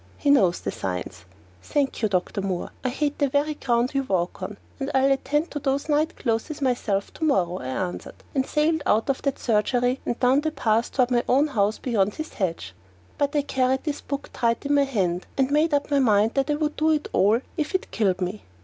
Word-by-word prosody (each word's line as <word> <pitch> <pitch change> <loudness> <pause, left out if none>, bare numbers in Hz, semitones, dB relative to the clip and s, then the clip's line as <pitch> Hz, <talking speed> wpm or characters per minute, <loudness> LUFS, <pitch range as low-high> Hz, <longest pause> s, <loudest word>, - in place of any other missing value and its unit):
He 285 - +2
knows 190 -11 +4
the - - -3
signs. 90 -1 -5 0.4
"Thank 280 - -1
you, 215 - +2
Dr. 190 +1 -1
Moore! 190 -2 -3
I 255 - +1
hate 290 +3 -2
the 285 -2 +2
very 285 +3 +1
ground 245 -3 0
you 275 - +1
walk 185 -8 -2
on, 200 +2 -5 0.2
and 275 0 -2
I'll 265 +1 +4
attend 295 +4 0
to 295 - -3
those 275 +1 -1
night 305 +2 +1
clothes 235 +5 -2
myself 240 -7 -1
to - - -7
morrow," 185 - +1
I 130 - -6
answered, 175 +8 -4 0.2
and 270 -3 +2
I - - -13
sailed 315 +1 +1
out 225 +6 +3
of 265 - -5
that 275 -2 -1
surgery 245 +3 +1
and 240 - -3
down 260 +3 +4
the 315 - 0
path 230 -6 0
toward 255 -1 +1
my 240 -1 +2
own 285 +4 +4
house 210 -5 +1
beyond 210 -5 0
his 310 0 -6
hedge. 165 - -3 0.5
But 285 +1 0
I 290 - +2
carried 265 -1 0
this 300 -3 -3
book 280 0 -5
tight 235 +2 0
in 285 - +1
my 285 -1 +4
hand, 185 -9 -1
and 270 -1 +2
I - - -7
made 310 +3 +3
up 285 0 0
my 285 - +4
mind 220 -3 +3
that 275 +1 0
I 295 - +2
would 300 0 -2
do 310 +1 +2
it 305 -1 +1
all 210 +4 +4 0.2
if 310 +3 -2
it 375 - -2
killed 190 -4 +1
me. 185 +3 -3
260 Hz, 230 wpm, -24 LUFS, 205-285 Hz, 0.5 s, knows